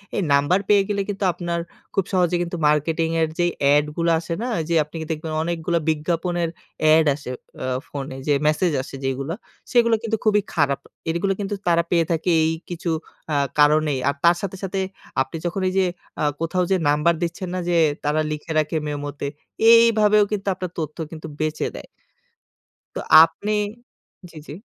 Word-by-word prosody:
এই 200 - +1
নাম্বার 145 +7 +3
পেয়ে 205 -1 +5
গেলে 200 -1 0
কিন্তু 200 0 -3
আপনার 170 0 -3 0.3
খুব 195 - +2
সহজে 180 -1 +2
কিন্তু 175 0 -3
মার্কেটিং 160 +2 +1
এর 160 - +3
যেই 175 0 +2 0.2
এড 150 0 +4
গুলো 170 0 +1
আসে 165 +1 -5
না? - - -2 0.2
যে 170 - +2
আপনি 150 +2 -17 0.2
দেখবেন 160 0 -4
অনেকগুলো 170 0 -1
বিজ্ঞাপনের 170 +2 -1 0.4
এড 160 0 +5
আসে 145 -3 -9 0.3
অ্যা 130 0 -2
ফোনে 135 -1 -6
যে 145 - +4
মেসেজ 160 +3 +2
আসে 135 - -9
যেগুলা 135 +5 -2 0.4
সেগুলো 235 -2 +4
কিন্তু 225 -1 -1
খুবই 210 -1 +4
খারাপ। 140 -3 +1 0.3
এরগুলা 175 +4 0
কিন্তু 205 0 -2
তারা 170 -1 +4
পেয়ে 170 -1 +3
থাকে 165 +2 0
এই 160 - +2 0.2
কিছু 175 -1 -4 0.4
আ - - +1 0.2
কারণেই। 150 -1 +4
আর 140 - +1
তার 170 - +6
সাথে, 195 -1 -4
সাথে 195 0 -2 0.4
আপনি 135 +5 -3
যখন 175 +3 -2
এইযে 190 0 +2 0.4
আ - - +1 0.2
কোথাও 180 +2 0
যে 190 - +4
নাম্বার 150 +4 +3
দিচ্ছেন 175 +2 -3
না 185 - -1
যে 175 - +2 0.3
তারা 150 +2 +1
লিখে 150 +2 -5
রাখে 155 +1 -1
মেমোতে 145 -1 -4 0.4
এইভাবেও 215 -2 +6
কিন্তু 200 -1 -3
আপনার 185 -1 -6
তথ্য 155 -2 -4
কিন্তু 160 -1 -8
বেঁচে 155 0 -1
দেয় - - -9 1.1
তো - - -2 0.2
আপনি 185 +6 -2 0.8
জি, 165 - -14
জি। - - -7
170 Hz, 175 wpm, -22 LUFS, 150-185 Hz, 1.1 s, তার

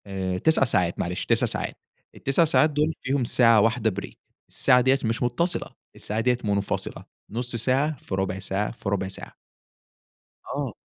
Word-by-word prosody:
آآ، 95 -2 -3
9 160 +7 +3
ساعات، 90 -9 +1
معلش، 90 +1 -2
9 - - +2
ساعات. - - -3 0.4
ال9 135 +5 +2
ساعات 155 0 +4
دول 150 +2 0
فيهم 135 0 0
ساعة 115 -2 +5
واحدة 110 -1 +1
break، - - -9 0.4
الساعة 125 0 +4
ديَّة 130 +2 +3
مش 115 +1 -1
متصلة، 170 +9 -1 0.3
الساعة 105 +1 -4
ديَّة 125 +2 +2
منفصلة، 100 -1 -2 0.2
0.5 120 +2 -3
ساعة 135 +6 +1
في 95 - -5
0.25 95 0 -2
ساعة 95 +2 -2
في 110 -3 -6
0.25 95 -1 -1
ساعة. 95 - -8 1.1
آه. - - -3
115 Hz, 160 wpm, -25 LUFS, 100-130 Hz, 1.1 s, ساعة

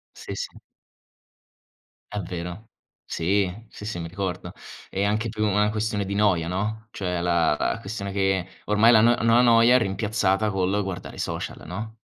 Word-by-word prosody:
Sì, - - -7
sì. - - -6 1.5
È 105 - -1
vero. 90 +4 -6 0.3
Sì, 95 +3 +1 0.2
sì, 105 - -10
sì, 105 -5 -4
mi 85 0 -5
ricordo. 95 0 -4 0.4
È 95 - -3
anche 110 +2 0
più 110 0 -1
una 105 +1 +2
questione 105 -1 -1
di 100 +1 -4
noia, 95 -5 +2
no, 110 +4 -3
cioè 90 -3 -2
la 85 -3 +2
la 115 - -1
questione 100 -2 -5
che 95 -2 +1 0.2
ormai 105 +3 +5
la 110 - +7
no 120 +2 +5
no 115 0 +4
la 120 - +7
noia 120 +1 +6
è - - +8
rimpiazzata 105 -1 +1
col 95 +2 0
guardare 95 -2 -6
i - - -10
social, - - -4
no? 110 +6 -6
100 Hz, 175 wpm, -25 LUFS, 95-110 Hz, 1.5 s, è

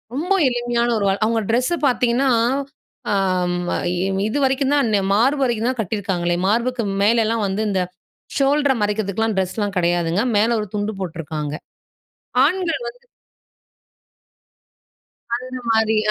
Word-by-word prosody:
ரொம்ப 345 +8 0
எளிமையான 240 -1 0
ஒரு 205 - 0
வா 195 - +3
அவுங்க 225 0 +1
ட்ரெஸ்ஸ 255 +8 +1
பாத்தீங்கன்னா, 250 +1 +2 0.8
ஆ - - +2 0.5
ம - - -1 0.2
இ - - -2 0.3
இதுவரைக்கும் 270 +2 +1
தான், 280 -5 +2
ன்ன 200 - +3
மார்பு 265 +7 +2
வரைக்கும் 240 -2 0
தான் 255 -2 -3
கட்டியிருக்காங்களே! 185 -4 -1
மார்புக்கு 235 +3 0 0.2
மேலலாம் 225 0 +2
வந்து 195 +2 -2
இந்த 190 -2 0 0.6
ஷோல்டர 285 0 +3
மறைக்கிறதுக்குலாம் 210 +1 0
ட்ரெஸ்லாம் 200 +2 -1
கெடையாதுங்க. 175 +2 +1
மேல 230 +3 +3
ஒரு 210 - -3
துண்டு 210 +1 -1
போட்ருக்காங்க. 155 -4 -4 0.9
ஆண்கள் 350 - 0
வந்து - - -12 2.3
அந்தமாரி, 235 -3 0
225 Hz, 120 wpm, -21 LUFS, 200-255 Hz, 2.3 s, வா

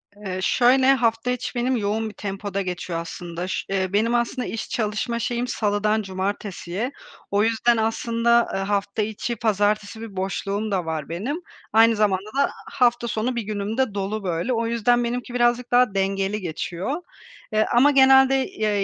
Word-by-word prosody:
Eee, 190 -3 -5
şöyle 260 +5 +4
hafta 235 -1 +1
içi 250 +1 -4
benim 250 +2 +1
yoğun 215 +1 -1
bir - - -12
tempoda 200 0 -4
geçiyor 180 -2 -4
aslında. 170 +1 -6
Ş 190 - -3
eee, 190 -1 -1
benim 225 +4 +2
aslında 240 +2 -1
iş 225 - -5
çalışma 225 +2 -1
şeyim 240 +1 -1
salıdan 210 -2 0
cumartesiye. 195 +3 -3 0.4
O 205 +1 +3
yüzden, 230 +1 +2
aslında, 230 +1 +2
eee, 195 - -1
hafta 200 +1 -1
içi 220 +3 -3
pazartesi 210 0 0
bir 225 -3 -8
boşluğum 200 +2 -2
da 185 -4 0
var 160 -2 -4
benim. 250 - -3 0.3
Aynı 225 0 +6
zamanda 205 -1 +1
da 280 - +4
ha - - +1 0.2
hafta 240 -3 +2
sonu 235 +3 -1
bir 235 - -1
günüm 210 +2 -4
de 260 -6 +1
dolu 200 +1 -3
böyle. 175 +7 -1
O 230 -1 0
yüzden 240 +1 +2
benimki 245 +1 -3
birazcık 240 0 +1
daha 245 -3 +4
dengeli 195 +1 0
geçiyor. 180 - -3 0.5
Eee, 215 0 +3
ama 275 +5 +6
genelde, 265 0 +6
eee, 210 -2 0
215 Hz, 170 wpm, -23 LUFS, 195-240 Hz, 0.5 s, Aynı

